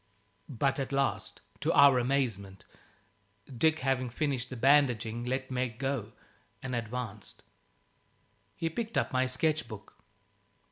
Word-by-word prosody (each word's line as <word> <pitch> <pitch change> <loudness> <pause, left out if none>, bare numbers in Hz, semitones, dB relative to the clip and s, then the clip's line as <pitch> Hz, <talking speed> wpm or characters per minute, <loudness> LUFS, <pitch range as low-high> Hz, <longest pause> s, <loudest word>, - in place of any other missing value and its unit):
But 135 +1 0
at 135 -1 -3
last, 140 0 -1 0.2
to 150 +3 +1
our 140 -3 +7
amazement, 115 -7 -1 0.9
Dick, 160 +6 +2
having 130 -1 0
finished 130 -1 -2
the 130 - -6
bandaging, 120 -4 +3
let 130 +1 -2
Meg 125 -3 -2
go 135 -5 -3 0.5
and 130 -1 -4
advanced. 115 -3 -6 1.1
He 165 - -2
picked 225 +7 -3
up - - 0
my 130 0 +2
sketch 150 +2 0
book. 110 -2 -10
130 Hz, 125 wpm, -30 LUFS, 120-140 Hz, 1.1 s, our